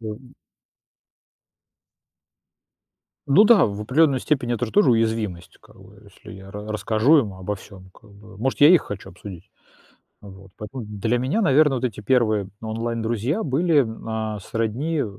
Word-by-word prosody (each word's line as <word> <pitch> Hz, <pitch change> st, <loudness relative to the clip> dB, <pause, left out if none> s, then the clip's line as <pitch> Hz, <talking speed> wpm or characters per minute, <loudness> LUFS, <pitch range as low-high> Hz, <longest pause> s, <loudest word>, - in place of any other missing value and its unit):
Да 110 Hz, -, -7 dB
и 130 Hz, +3 st, -17 dB, 2.9 s
Ну 145 Hz, +9 st, +5 dB
да, 210 Hz, -5 st, +6 dB
в 100 Hz, 0 st, -5 dB
определенной 135 Hz, +3 st, +2 dB
степени 120 Hz, -5 st, -1 dB
это 115 Hz, 0 st, -3 dB
тоже 160 Hz, -, +4 dB
уязвимость, 110 Hz, -7 st, -2 dB
как -, -, -21 dB
бы -, -, -17 dB
если -, -, -15 dB
я 95 Hz, 0 st, -12 dB
ра 105 Hz, +1 st, -8 dB
расскажу 110 Hz, +8 st, +3 dB
им 105 Hz, -8 st, -2 dB
обо 95 Hz, +2 st, -4 dB
всём 95 Hz, -1 st, -14 dB
как 105 Hz, +3 st, -21 dB
бы, 100 Hz, 0 st, -16 dB
может, 130 Hz, +6 st, -2 dB
я 145 Hz, -, +8 dB
их 175 Hz, -1 st, +6 dB
хочу 95 Hz, -1 st, -8 dB
обсудить. 95 Hz, 0 st, -12 dB, 0.7 s
Вот. 95 Hz, -1 st, -14 dB
Поэтому 120 Hz, +4 st, -7 dB
для 105 Hz, +3 st, -2 dB
меня, 130 Hz, -, -1 dB
наверное, 150 Hz, -5 st, +3 dB
вот 125 Hz, -, -4 dB
эти 120 Hz, -5 st, -3 dB
первые 110 Hz, -5 st, +1 dB
онлайн-друзья 115 Hz, -, -2 dB
были, 150 Hz, 0 st, +2 dB, 0.2 s
а, 110 Hz, -1 st, -3 dB
сродни, 115 Hz, -, -3 dB
э, -, -, -3 dB
115 Hz, 155 wpm, -22 LUFS, 105-135 Hz, 2.9 s, я